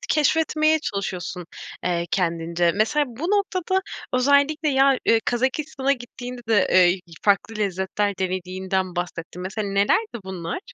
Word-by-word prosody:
keşfetmeye 310 0 +3
çalışıyorsun, 185 - -4 0.4
eee, 170 -1 0
kendince. 170 -1 +1
Mesela 225 +8 +2
bu 245 +4 -9
noktada 380 -1 +1 0.3
özellikle 285 +4 +3
ya, 270 -1 +4 0.2
ııı, 225 - +5
Kazakistan'a 265 +2 0
gittiğinde 245 0 -8
de, 215 -4 +3
eee, - - +5
y 180 +2 +1 0.2
farklı 205 +2 +2
lezzetler 200 0 -1
denediğinden 185 0 -2
bahsettin. 175 0 -5
Mesela 205 +3 -3
nelerdi 220 - +1
bunlar? 180 - -5
210 Hz, 125 wpm, -23 LUFS, 185-280 Hz, 0.4 s, ııı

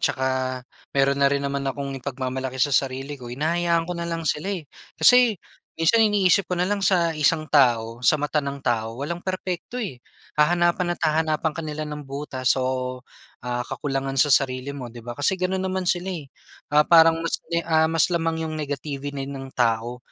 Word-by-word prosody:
tsaka 130 0 0 0.7
mayroon 140 0 +3
na 140 - +5
rin 140 0 -1
naman 140 0 -2
akong 140 0 -4
ipagmamalaki 130 0 -4
sa 140 +2 +1
sarili 135 +2 -1
ko. 120 - -8
Hinahayaan 165 +5 0
ko 180 - -4
na 170 0 -4
lang 165 -1 -3
sila, 150 +5 -1
eh. 185 -6 -3 0.3
Kasi, 245 -4 +6 0.4
minsan 165 +8 +3
iniisip 200 -4 +3
ko 180 - -1
na 180 - +1
lang 200 +2 -1
sa 175 -3 +2
isang 155 +1 +2
tao, 120 -5 +3
sa 140 +5 +4
mata 150 +1 0
ng 140 -1 -5
tao, 115 -1 -1
walang 170 +4 -3
perpekto, 185 +3 -4
eh, 175 - -5 0.4
hahanapan 175 +3 +2
at - - -29
hahanapan 155 0 +1
ka 165 - -5
nila 150 0 -4
ng 150 -1 -6
butas 135 -2 -1
o, 130 0 -2 0.4
ah, 125 0 -2
kakulangan 135 -1 -3
sa 145 - +4
sarili 130 0 +2
mo, 140 -3 -6
'di 120 - -10
ba? 120 +2 -8
Kasi, 145 +6 +2
gano'n 185 0 -1
naman 185 0 -2
sila, 180 +1 0
eh, 145 -5 -8 0.4
ah, 150 +1 +4
parang 165 -1 +6
mas 165 0 -2
may 170 - +1
ah, 160 -1 +3
mas 165 -2 +3
lamang 165 -1 0
'yong 155 - -5
negativity 145 -1 -4
ng 135 -1 -7
tao. 120 0 0
150 Hz, 190 wpm, -24 LUFS, 135-170 Hz, 0.7 s, Kasi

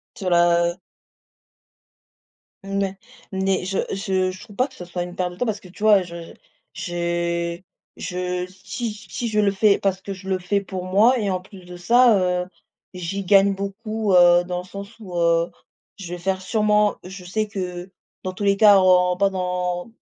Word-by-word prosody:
Sur 190 -5 -3
la, 170 0 +4
heu - - -14 1.9
Mouais, 195 0 -2 0.4
mais 190 -1 0
je 190 +1 -2
je 190 -1 0
je 185 0 -10
trouve 215 -4 -13
pas 255 +7 +1
que 265 - -19
ça 180 - -9
soit 175 0 -4
une 175 0 -7
perte 180 -1 -1
de - - -12
temps 245 - -1
parce 215 -2 -1
que - - -15
tu 185 +3 -14
vois 210 -3 +6
je 170 -1 -9 0.4
j'ai 170 0 -2 0.3
je 180 0 -3
si 195 +5 -6
si 215 +2 -6
je 215 -2 +1
le 205 -1 +3
fais 200 +1 +3
parce 190 -1 0
que 195 +1 -6
je 190 0 -9
le 190 -1 +1
fais 185 +3 0
pour 190 -2 -6
moi 215 +7 +4
et 205 - -1
en 185 -1 -1
plus 185 0 -14
de 180 0 -10
ça, 235 +5 +5
heu, 180 -1 0 0.5
j'y 180 +2 -4
gagne 195 +1 +5
beaucoup, 200 +2 -3
heu, 175 0 +6
dans 180 0 -3
le - - -10
sens 200 +2 -8
où, 185 -5 -8
heu, 170 0 +2 0.5
je 175 -3 -8
vais 180 - -7
faire 190 +1 -1
sûrement 210 0 +2
je 185 0 -10
sais 215 +4 -2
que, 180 -2 -5 0.3
dans 185 - -4
tous 195 +2 -5
les 200 0 +3
cas 205 -1 +7
en 180 -1 +4
pas 200 +2 +3
dans 180 0 -3
185 Hz, 195 wpm, -22 LUFS, 180-200 Hz, 1.9 s, cas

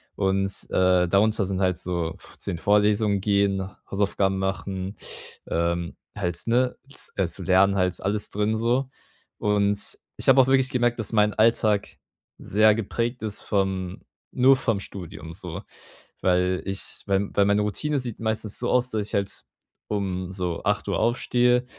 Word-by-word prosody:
Und, 95 0 +1 0.2
äh, 90 -1 +3
darunter 105 +3 +3
sind 95 0 -2
halt 90 -2 +2
so 85 -3 -2
f - - -14
zu - - -3
den 85 - -3
Vorlesungen 105 +1 +3
gehen, 100 -1 +1 0.2
Hausaufgaben 100 -1 +1
machen, 95 0 -3 0.5
ähm, 85 +1 -1 0.2
halt, 90 -4 -2
ne, 125 +2 +1 0.2
z - - -2
äh, 95 -3 +2
zu 85 +3 -5
lernen 95 +3 +4
halt, 90 -1 0
alles 105 +2 -1
drin 105 +2 0
so. 125 +4 +1 0.5
Und 100 -1 0 0.2
ich - - -2
habe 135 0 +7
auch 130 - +2
wirklich 130 -1 +3
gemerkt, 120 -2 +1
dass 115 0 -3
mein 105 -1 +3
Alltag 110 -2 +2 0.4
sehr 110 +1 +3
geprägt 115 +3 -2
ist 105 -2 -3
vom 95 -2 -1 0.3
nur 130 +2 +5
vom 115 -5 0
Studium 85 -5 -8
so, 90 -2 -7 0.6
weil 90 0 +2
ich 95 0 -4
weil 100 0 +1
weil 100 - +4
meine 100 +1 +3
Routine 140 +8 -1
sieht 120 -4 -5
meistens 110 -2 -2
so 120 - -1
aus, 125 0 +2
dass 105 -2 -1
ich - - -7
halt 100 -1 -2 0.4
um 95 -3 -2
so 90 -3 -3
8:00 - - 0
aufstehe 125 +1 +2
100 Hz, 160 wpm, -25 LUFS, 95-110 Hz, 0.6 s, habe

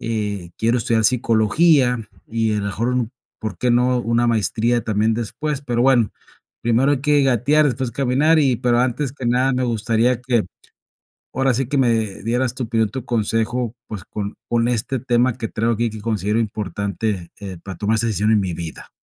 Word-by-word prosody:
eh, 105 -6 -3
quiero 115 +2 +2
estudiar 115 -1 +1
psicología, 125 +2 +3 0.2
y 110 -1 0
a - - 0
la 100 - -3
mejor 110 +4 -2
un, 125 -3 -1 0.3
¿por 105 -5 -5
qué 125 - +1
no?, 125 +1 +3
una 120 0 +1
maestría 115 +1 +1
también 110 0 +1
después, 140 +5 -3
pero 120 -3 0
bueno, 125 -4 +4 0.5
primero 120 +5 +3
hay 140 - 0
que 145 0 +3
gatear, 135 +4 +3
después 130 -2 -1
caminar, 140 +5 +2
y, 135 -4 +2
pero 120 0 +2
antes 125 +2 -1
que 130 -3 -6
nada 125 +3 +2
me 130 0 0
gustaría 115 +1 +1
que 120 -3 +1 0.9
ahora 135 0 +2
sí 130 +1 -1
que 140 - -1
me 115 -6 +1
dieras 120 +2 0
tu 130 - -3
opinión, 110 -1 0
tu 130 0 -6
consejo, 115 +1 -1
pues, 105 -5 -7
con 100 0 -5
con 120 0 +2
este 125 +2 -1
tema 120 0 +1
que 115 -3 -3
traigo 115 +1 0
aquí 115 +1 0
que 110 0 -8
considero 105 -1 -1
importante, 100 -3 -3
eh, 95 -3 -7
para 95 -3 -7
tomar 105 +4 +1
esa 115 +2 0
decisión 105 0 +1
en 110 - +4
mi 95 -3 -3
vida. 80 -1 -7
115 Hz, 190 wpm, -20 LUFS, 110-125 Hz, 0.9 s, bueno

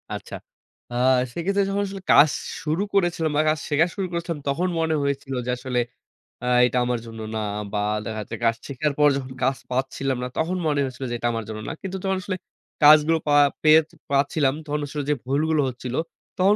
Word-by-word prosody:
আচ্ছা। - - -6 0.6
আ - - -5 0.4
সেক্ষেত্রে 195 +6 0
যখন 200 +1 0
আসলে 195 0 -7
কাজ 150 +2 +8 0.3
শুরু 160 +5 0
করেছিলাম 175 -5 +1
বা - - +5
কাজ 155 0 +1
শেখা 150 +2 +4
শুরু 195 -2 -2
করেছিলাম, 170 -2 -3
তখন 160 +7 +1
মনে 160 -1 +1
হয়েছিল 140 -1 -2
যে, - - -4
আসলে 125 -1 -2 0.6
আ - - -2 0.2
এটা 125 - 0
আমার 120 -1 0
জন্য 115 -1 -9 0.2
না - - -1 0.3
বা 105 - 0 0.3
দেখা 110 -1 -4
যাচ্ছে 110 +2 -6
কাজ 115 0 +3
শেখার 145 +2 -1
পর 150 - +6
যখন 130 -1 -6
কাজ 130 +1 +2
পাচ্ছিলাম 135 +1 -1
না, - - -2
তখন 170 +3 0
মনে 145 -2 +1
হয়েছিল 130 0 -5
যে, - - -1
এটা 120 - 0
আমার 115 0 -3
জন্য 110 -1 -5
না। - - -3
কিন্তু 190 -1 -4
যখন 190 -1 0
আসলে 190 -2 -3 0.5
কাজগুলো 155 +2 +7
পা 145 - +3 0.3
পেয়ে 155 0 +8 0.3
পাচ্ছিলাম, 140 0 +2
তখন 150 0 -2
আসলে 145 +1 -4
যে, 150 - +3
ভুলগুলো 150 +3 +1
হচ্ছিল, 125 0 -6 0.4
তখন 195 +3 +4
150 Hz, 195 wpm, -24 LUFS, 130-165 Hz, 0.6 s, কাজ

